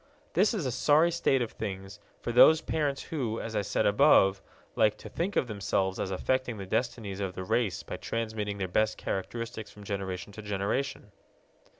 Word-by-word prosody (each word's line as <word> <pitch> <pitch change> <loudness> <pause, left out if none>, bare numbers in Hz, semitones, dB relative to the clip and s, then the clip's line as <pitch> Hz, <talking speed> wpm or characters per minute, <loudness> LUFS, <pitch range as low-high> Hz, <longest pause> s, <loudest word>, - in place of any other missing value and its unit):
This 200 +6 +3
is 185 -9 -2
a 130 - 0
sorry 155 +7 +4
state 135 -6 +2
of 115 - -5
things 95 -1 -6 0.2
for - - -3
those 155 +6 +7
parents 145 -4 -1
who, 120 -8 -3
as 115 -1 -5
I 105 - +2
said 100 - 0
above, 100 -4 +5 0.3
like 105 -1 +3
to - - -10
think 190 +4 -2
of - - +2
themselves 95 -3 -1
as - - -2
affecting 125 +5 -1
the 100 - -6
destinies 110 -1 -2
of 95 -2 -3
the 95 - -4
race 95 0 0
by - - -6
transmitting 110 -3 -3
their 95 -2 -2
best 110 +4 +1
characteristics 110 +3 -4
from 105 - -13
generation 100 -1 -4
to 110 - -8
generation. 105 +3 -2
110 Hz, 185 wpm, -29 LUFS, 100-130 Hz, 0.3 s, those